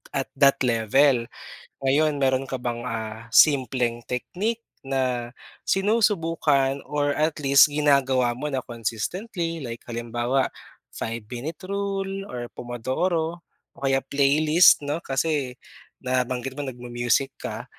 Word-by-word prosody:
at 135 - -2
that 140 -1 +6
level. 120 +2 +3 0.5
Ngayon, 150 +3 +2
meron 130 0 +2
ka 130 -2 -5
bang, 120 0 -3
ah, 110 -1 -5
simpleng 125 -5 +3
technique 205 - -3 0.2
na 125 -3 -1 0.3
sinusubukan 165 -10 +2
or 145 -1 -1
at 155 +1 +2
least 140 -1 +7
ginagawa 135 -5 +2
mo 150 +1 -4
na 130 - 0
consistently, 165 - -4
like 115 0 -7
halimbawa 120 +3 -1 0.5
5 115 -1 -5
minute 125 +8 -6
rule 195 0 -3
or 120 -1 -5
Pomodoro 160 +8 -2 0.3
o - - -31
kaya 135 -1 +2
playlist 150 +3 +4
'no, 150 +4 -2
kasi 135 -2 -1 0.5
nabanggit 130 0 -1
mo 145 - -5
nag-mu-music 125 +1 -1
ka. - - -5
135 Hz, 120 wpm, -24 LUFS, 120-155 Hz, 0.5 s, least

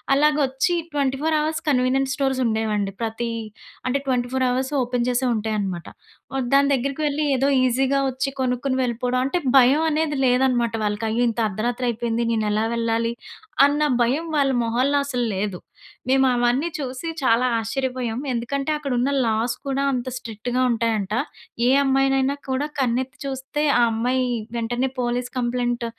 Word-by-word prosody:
అలాగొచ్చి 290 +2 +2 0.2
24 290 +2 0
hours 310 +1 -1
convenience 265 0 +2
stores 270 -2 0
ఉండేవండి. 215 -3 0
ప్రతి 230 +1 -2 0.6
అంటే, 275 +2 0
24 255 0 0
అవర్సు 260 +3 -1
ఓపెన్ 245 0 -1
చేసే 250 +1 +1
ఉంటాయి 215 0 -2
అన్నమాట. 185 -4 -4 0.7
దాని 280 0 +5
దగ్గరికి 275 +4 -3
వెళ్లి 295 +1 -1
ఏదో 270 - +2 0.2
ఈసీగా 265 +2 +2
వచ్చి 265 +2 -2
కొనుక్కొని 255 +1 0
వెళ్ళిపోవడం. 250 +1 -1
అంటే 275 +7 0 0.2
భయం 265 +5 +5
అనేది 310 -1 0
లేదన్నమాట 245 -2 +2
వాళ్ళకి. 210 +2 -2
అయ్యో! 235 +2 +1
ఇంత 230 - -6
అర్ధరాత్రి 240 +5 -2
అయిపోయింది 235 0 -1
నేను 220 -1 0
ఎలా 215 +1 +1
వెళ్ళాలి, 230 0 0 0.5
అన్న 290 +1 +1 0.2
భయం 275 +8 0
వాళ్ళ 275 -1 +3
మొహాల్లో 255 +5 +1
అసల్లేదు. 210 -8 -2 0.5
మేము 265 0 +4
అవన్నీ 245 +6 +1
చూసి 265 +2 -5 0.2
చాలా 240 +1 +3
ఆశ్చర్యపోయాము. 250 +1 -3
ఎందుకంటే, 275 +5 -2
అక్కడ 290 -2 -5
ఉన్న 265 +3 +1 0.2
లాస్ 225 +2 0
కూడా 275 0 0
అంత 250 0 -3
స్ట్రిక్ట్‌గా 240 +1 -3
ఉంటాయంట. 220 -3 -1 0.5
ఏ - - +4
అమ్మాయినైనా 270 0 +2
కూడా 265 +3 0
కన్నెత్తి 260 +2 -1
చూస్తే, 270 +2 -3 0.2
ఆ - - +5
అమ్మాయి 250 +3 0 0.3
వెంటనే 240 +3 -1
పోలీస్ 245 +1 -1
కంప్లెయింట్ 240 -1 -1
250 Hz, 145 wpm, -23 LUFS, 235-270 Hz, 0.7 s, దాని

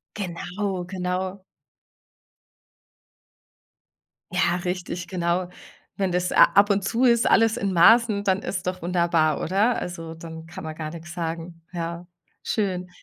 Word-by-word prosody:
Genau, 185 0 -3
genau. 185 +1 -3 2.9
Ja, 180 -1 +2
richtig, 180 -1 -4
genau. 175 0 -1 0.5
Wenn 195 -2 0
das 180 0 0
a - - +8
ab 205 +1 +5
und 200 0 +2
zu 235 +6 +1
ist, 235 -1 +4
alles 225 +1 +4
in 200 -4 -1
Maßen, 215 +3 +5
dann 190 -1 +2
ist 180 -4 -4
doch 185 0 -2
wunderbar, 170 -2 +1
oder? 205 +7 +2
Also, 165 -2 -6
dann 160 0 -9
kann 165 0 -9
man 155 0 -5
gar 155 -1 -5
nix 170 +1 -9
sagen. 165 0 -5
Ja, 170 0 -5 0.4
schön. 185 -4 -1
180 Hz, 135 wpm, -24 LUFS, 170-195 Hz, 2.9 s, a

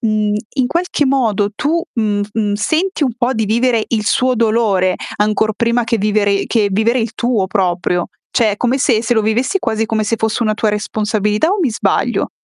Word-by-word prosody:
mhmm, 215 -2 0 0.2
in 260 -3 +1
qualche 335 -1 0
modo 225 -7 +1
tu, 320 +8 0 0.2
mhmm, 205 -2 0
mhmm, 210 -2 -1
senti 315 - 0
un 255 - 0
po' 250 +1 0
di 220 -1 0
vivere 230 +1 +1
il 220 -3 -1
suo 255 +4 +2
dolore, 215 -5 +1 0.2
ancor 215 +1 +1
prima 235 +2 +1
che 230 0 0
vivere 205 -1 +1
che 210 -4 +1
vivere 225 +5 +2
il 225 -1 -2
tuo 235 -6 0
proprio. 180 -2 -1 0.2
Cioè 225 -3 +3
è - - -4
come 245 +4 0
se 240 -3 +2
se 235 +1 0
lo 220 - +2
vivessi 245 - 0
quasi 220 0 -1
come 220 -1 -1
se 220 +2 -1
fosse 220 +2 -1
una 215 -1 +1
tua 215 0 0
responsabilità, 210 - 0
o 405 - 0
mi 285 - +1
sbaglio? 220 - 0
220 Hz, 200 wpm, -16 LUFS, 210-245 Hz, 0.2 s, Cioè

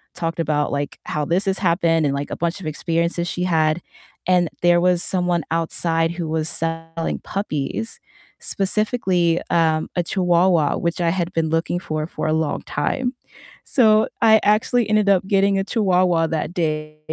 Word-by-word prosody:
talked 165 -1 -3
about, 150 -2 0
like, 145 0 -3
how 150 - -2
this 180 +6 0
has 195 0 0
happened 170 -3 +2
and, 140 - +1
like, 140 +1 -4
a - - -2
bunch 170 +3 -2
of 165 - -6
experiences 170 +2 -1
she 180 +1 -3
had. 160 -1 +1 0.5
And 180 -3 +3
there 175 0 +4
was 180 -1 +2
someone 180 -3 0
outside 165 0 0
who 170 -1 -4
was 160 0 -1
selling 165 0 -3
puppies, 200 +3 -4 0.4
specifically, 190 -4 +1
um, 160 -2 +1
a 175 - +2
chihuahua, 175 -3 +2
which 170 +1 -2
I 170 - +2
had 175 0 -2
been 160 -2 0
looking 165 +2 -1
for 155 -3 -4
for 165 - -4
a 155 - +1
long 160 -2 -1
time. 255 -2 -2 0.5
So 220 -5 +4
I 220 -1 +6
actually 215 +2 +2
ended 215 -1 +3
up 190 -1 +3
getting 195 0 +2
a - - 0
chihuahua 180 -7 +2
that 160 +1 -3
day. 155 -3 -3
170 Hz, 170 wpm, -21 LUFS, 160-190 Hz, 0.5 s, I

